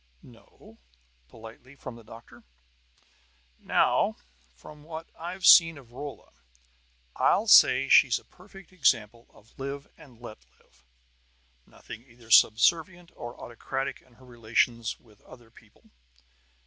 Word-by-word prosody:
"No?" 115 -1 -20 0.5
politely, 115 +4 -15
from 130 - -10
the 115 - -15
doctor. 115 +2 -16 1.2
"Now, - - 0 0.4
from 150 - -15
what 160 +1 -9
I've 180 +3 -7
seen 165 -2 +7
of 125 -4 -17
Rolla, 140 +3 -10 0.9
I'll - - +1
say - - +5
she's - - +4
a - - -15
perfect 195 0 -18
example 120 - -1
of 110 - -24
'live 140 +1 -6
and 125 -5 -18
let 120 -3 -11 0.2
live.' - - -31 0.8
Nothing 110 - -13
either 120 -2 -19
subservient 170 - +3
or 120 0 -10
autocratic 135 +3 -6
in 130 - -27
her 130 +2 -21
relations 115 -1 -2
with 105 -3 -25
other 120 -2 -18
people. 110 -2 -24
120 Hz, 120 wpm, -26 LUFS, 115-150 Hz, 1.2 s, seen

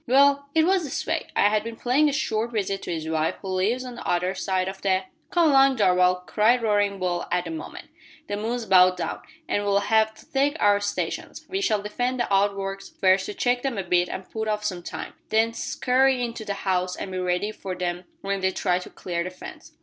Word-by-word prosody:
"Well, 280 +2 +4
it 320 0 +5
was 375 0 +2
this 285 -3 -4
way. - - -1
I 205 - +4
had 210 0 +1
been 230 0 -6
paying 270 +6 +2
a - - -1
short 235 -5 -1
visit 195 -2 -1
to - - -5
his 160 -2 -3
wife, 160 0 0
who 190 - -5
lives 205 +8 0
on 250 - -7
the 240 - -8
other 180 +2 +1
side 185 -1 -1
of 190 0 -6
the 190 -1 +1
" - - -43
"Come 345 -4 +3
along, 270 -1 +5
Darvall," 180 -2 +3
cried 230 +5 +3
Roaring 205 -2 +2
Bull 180 -2 -1
at 180 0 +1
that 165 - -5
moment. 160 -1 -8 0.4
"The 205 - -2
moon's 230 +3 -2
about 185 -3 +5
down, 175 - -4 0.3
an' 205 - 0
we'll 200 -1 +2
have 220 +1 +2
to - - -19
take 285 +3 +1
our 205 -1 +4
stations. 205 0 -4
We 385 +1 -2
shall 215 - +1
defend 245 +4 -2
the 235 -4 0
outworks 195 0 0
first 190 0 +2
to 210 - -6
check 245 0 +1
them 265 -4 -2
a 195 - -1
bit 175 0 +2
and 190 - -6
put 220 -1 -4
off 210 -1 -1
some 185 -4 -2
time, - - -7 0.2
then 225 +1 +2
scurry 255 +2 +1
into 230 -2 -5
the 200 - -2
house 185 -2 -1
and 190 - -6
be 185 - -3
ready 180 +3 0
for 190 -3 -6
them 180 0 -3 0.2
when 195 0 -2
they 190 - +2
try 180 -1 0
to 180 - -9
clear 170 -2 -4
the 180 - -4
fence. 185 - -11
205 Hz, 235 wpm, -25 LUFS, 185-240 Hz, 0.4 s, it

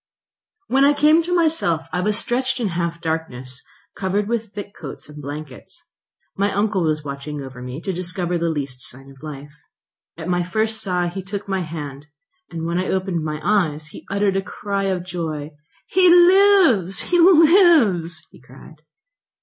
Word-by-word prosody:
When 270 -5 +2
I 285 +1 +5
came 305 +3 +5
to 355 +2 -1
myself, 310 - +1
I 180 - 0
was 210 +2 0
stretched 255 +3 0
in 225 -4 -1
half 170 -1 -3
darkness, 130 -6 -3 0.3
covered 200 +2 -1
with 225 -2 -2
thick 205 -1 -8
coats 140 -5 -9
and 150 0 -11
blankets. 145 -1 -9 0.5
My 200 +1 0
uncle 205 -1 0
was 155 -1 0
watching 145 +1 -6
over 130 -2 -10
me, 125 +3 -6
to 190 - -3
discover 180 0 -1
the 170 0 0
least 140 -5 -4
sign 135 +3 -10
of 135 - -18
life. 145 -1 -9 0.6
At 160 0 -7
my 175 -1 +1
first 220 +5 -1
sigh 180 -2 0
he 190 +2 -6
took 200 +2 -6
my 190 -1 -1
hand; 150 -4 -7 0.4
when 170 +1 -2
I 185 - -2
opened 185 -3 -1
my 150 -1 -3
eyes 155 -7 0
he - - -12
uttered 200 -1 +1
a - - +1
cry 200 0 -3
of 185 -2 -2
joy. 160 -4 -4 0.3
"He 370 -1 +4
lives! 350 - +5
he 350 - +4
lives!" 315 - +5
he - - -18
cried. 135 +5 -16
180 Hz, 170 wpm, -21 LUFS, 155-215 Hz, 0.6 s, I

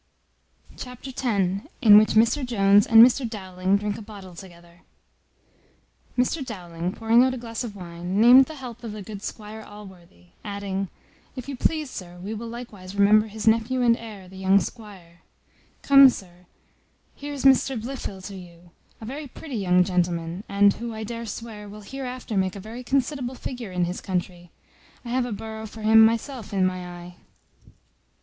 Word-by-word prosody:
Chapter 250 +1 -8
x. - - -7 0.6
In 215 -6 +8
which 215 - +2
Mr 230 +6 +3
Jones 205 -4 +4
and 225 0 +9
Mr 250 -1 0
Dowling 190 -2 -1
drink 205 +1 -3
a - - -9
bottle 200 -4 -11
together. 175 -1 -14 1.4
Mr 255 +4 +1
Dowling, 175 -7 -5
pouring 225 +4 +3
out 260 0 +1
a - - -6
glass 230 0 -5
of 220 -4 -7
wine, 175 +1 -4
named 250 +4 +8
the 315 - -9
health 245 -4 -9
of 225 -3 -6
the 210 -1 -7
good 205 0 -8
Squire 215 0 -7
Allworthy; 185 - -14
adding, 200 -1 -4 0.5
"If 255 -1 -7
you 280 - -4
please, 305 +2 -1
sir, 175 -1 -9
we 195 +5 -6
will 225 +2 -6
likewise 220 -5 -9
remember 210 +2 +5
his 215 +1 -6
nephew 230 +3 +2
and 235 -1 +5
heir, 215 -5 -10
the 190 +1 -13
young 190 +1 +4
squire: 195 -7 -9 0.6
Come, 275 -1 +8
sir, 180 -6 -9 0.7
here's 285 -1 -6
Mr 265 -2 +4
Blifil 220 -5 -6
to 200 +1 -7
you, 175 -1 -13 0.3
a 220 - -9
very 285 +5 -6
pretty 270 +1 -9
young 180 -2 +3
gentleman; 175 0 -1
and 200 0 +4
who, 235 -1 -6
I 220 - -5
dare 230 +1 -6
swear, 210 -1 -8
will 210 +1 -10
hereafter 255 0 -6
make 190 -1 0
a - - -7
very 225 +5 -8
considerable 265 -1 -1
figure 245 -6 -7
in 180 -1 0
his 180 +2 -5
country. 175 -2 -4 0.6
I - - -6
have 250 0 0
a - - -6
borough 220 +1 -6
for 220 +1 -11
him 220 +1 +7
myself 230 0 0
in 190 -2 +2
my 185 -1 -2
eye." 175 0 -10
215 Hz, 175 wpm, -24 LUFS, 185-240 Hz, 1.4 s, and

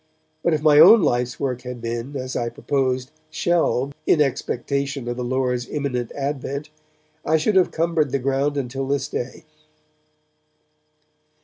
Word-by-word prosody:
But 170 - +2
if 150 - -4
my 150 -1 +6
own 195 +5 +9
life's 125 -3 0
work 130 -3 -2
had 125 -1 -7
been, 120 +4 -5
as 130 0 -5
I 120 -1 -1
proposed, 130 0 -1 0.2
shelved 160 -4 0
in 160 - +4
expectation 140 -1 -1
of 120 - -2
the 125 - -4
Lord's 125 -1 -1
imminent 130 -5 -2
advent, 140 +1 -4 0.5
I 160 - +2
should 160 +7 +1
have 185 -1 +4
cumbered 165 -2 0
the 140 - +1
ground 135 +2 0
until 135 0 -3
this 140 0 -1
day. 125 -1 -5
135 Hz, 145 wpm, -22 LUFS, 125-150 Hz, 0.5 s, own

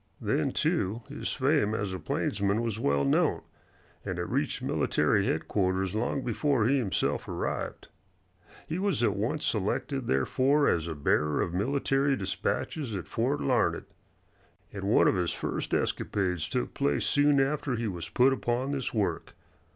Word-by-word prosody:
Then, - - 0
too, 110 +5 0
his 145 - -4
fame 135 -6 +2
as 100 -3 -2
a 95 - -4
plainsman 100 +2 0
was 115 -2 -2
well 70 -7 +1
known, 70 - +2 0.6
and - - -4
it - - -1
reached - - -1
military - - +1
headquarters 95 -1 0
long 120 +5 -1
before 125 -1 +1
he 140 +2 +3
himself 105 -7 -1
arrived. - - -4 0.8
He 165 +3 -3
was 195 -9 0
at 105 -4 +2
once 115 +9 -1
selected, 115 +5 -1
therefore, 130 - +2
as 85 -1 +1
a 80 - -4
bearer 75 +1 +1
of 85 - -4
military 135 +6 +1
dispatches 115 - -2
at 95 - -5
Fort 135 +6 -1
Larned, 130 -3 +1 0.9
and 100 -1 -5
one 105 - +4
of - - +4
his 90 -2 0
first - - -3
escapades 90 -5 -1
took - - -2
place 70 -1 0
soon 145 -1 +3
after 135 -1 0
he 115 -1 -2
was 90 -4 -5
put 130 +2 +4
upon 125 +1 -1
this 135 -4 -3
work. 105 -3 -1
115 Hz, 155 wpm, -29 LUFS, 95-135 Hz, 0.9 s, one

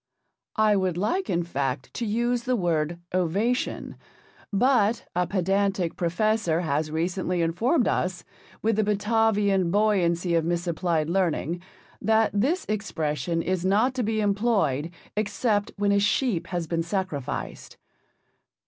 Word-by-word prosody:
I 215 -1 +4
would 185 -3 0
like, 235 - -1
in 170 0 +1
fact, 135 -5 -3
to 235 - -3
use 240 +3 0
the 255 -1 +1
word 170 -4 0 0.2
ovation, 195 +8 -1 0.5
but 230 0 +2
a 180 0 +1
pedantic 195 -2 0
professor 175 -1 +1
has 155 -1 -1
recently 175 +2 -1
informed 230 - +1
us, 180 -1 -1 0.4
with 220 -1 +2
the 215 - +3
Batavian 210 -3 +2
buoyancy 180 -4 +2
of 165 -1 +3
misapplied 170 -1 0
learning, 175 -1 0 0.4
that 220 0 +3
this 270 - +1
expression 165 -5 -2
is 185 -1 -1
not 210 +7 +3
to 255 - -2
be 220 -1 0
employed 200 - +1 0.3
except 210 0 0
when 200 0 +2
a 200 - +4
sheep 205 -2 +1
has 175 -2 -2
been 165 +1 -1
sacrificed. 170 -6 -4
195 Hz, 130 wpm, -26 LUFS, 170-215 Hz, 0.5 s, I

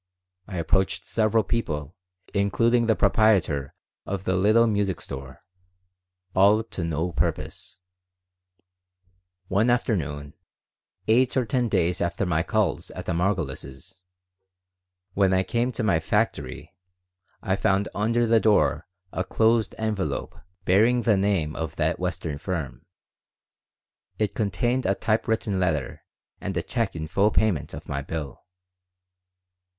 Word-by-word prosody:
I 95 -2 -6
approached 95 +3 0
several 110 0 +2
people, 80 -8 -3 0.4
including 115 +4 +2
the 110 - +4
proprietor 90 -14 +2 0.3
of 95 -1 -4
the 95 - 0
little 110 +5 +4
music 100 -5 0
store. 65 -1 -8 0.9
All 100 +4 +5
to 105 -5 -6
no 85 +2 -1
purpose - - -3 1.7
One 105 +6 +2
afternoon, 80 - -1 0.7
eight 125 +4 +3
or 130 - +2
ten 120 +1 0
days 85 -3 +1
after 85 +3 -1
my 85 -3 +1
call - - 0 0.2
at - - -6
the - - -2
Margolises', 85 -4 -3 1.1
when 95 -1 +3
I 95 - +2
came 120 +5 0
to 120 - -3
my 85 -7 +3
"factory" 80 - -2 0.7
I 95 - +1
found 100 0 +1
under 115 +3 +1
the 115 0 +4
door 110 -1 +2 0.2
a 95 - -2
closed 110 +2 +2
envelope 110 -3 -2 0.3
bearing 115 +6 +4
the 105 -1 +4
name 95 -6 0
of 80 -3 -4
that - - 0
Western 75 -3 -3
firm. 80 -4 -5 1.3
It 105 -2 0
contained 115 +5 0
a 100 - +2
typewritten 110 -2 0
letter 80 -7 -1 0.4
and 95 -3 -4
a 85 - -1
check 115 -7 -2
in 80 -1 -4
full 100 +6 +2
payment 105 -8 0
of - - -10
my 70 0 -3
bill. 75 -2 -6
100 Hz, 125 wpm, -25 LUFS, 85-110 Hz, 1.7 s, All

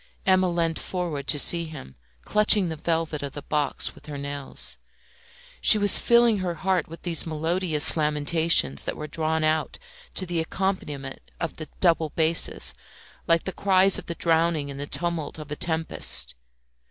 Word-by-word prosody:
Emma 185 -1 +3
leant 165 -2 -1
forward 165 -7 -4
to 150 - +2
see 170 +3 +5
him, 145 - -10 0.3
clutching 210 -3 +3
the 160 - -4
velvet 160 -1 -2
of 140 -1 -6
the 145 - -8
box 150 -1 -1
with - - -17
her 145 -1 -6
nails. 140 0 -7 0.8
She 215 - +8
was 205 -1 +7
filling 235 -3 +3
her 180 -2 -3
heart 185 -2 -1
with 165 +1 -12
these 170 -2 +1
melodious 160 0 +1
lamentations 150 - +2
that - - -4
were 150 - -6
drawn 160 +1 -1
out 155 0 0 0.4
to 185 - 0
the 175 -2 -2
accompaniment 160 -6 -4
of 165 - -4
the 155 - -7
double 165 -3 +2
basses, 165 +1 0 0.5
like 165 0 +3
the 190 - -5
cries 195 -1 +4
of - - -12
the 170 - -4
drowning 165 -3 +1
in 140 - -8
the 145 +1 -5
tumult 170 -2 -3
of 150 -1 -10
a - - -2
tempest. 160 0 -2
165 Hz, 165 wpm, -24 LUFS, 150-180 Hz, 0.8 s, She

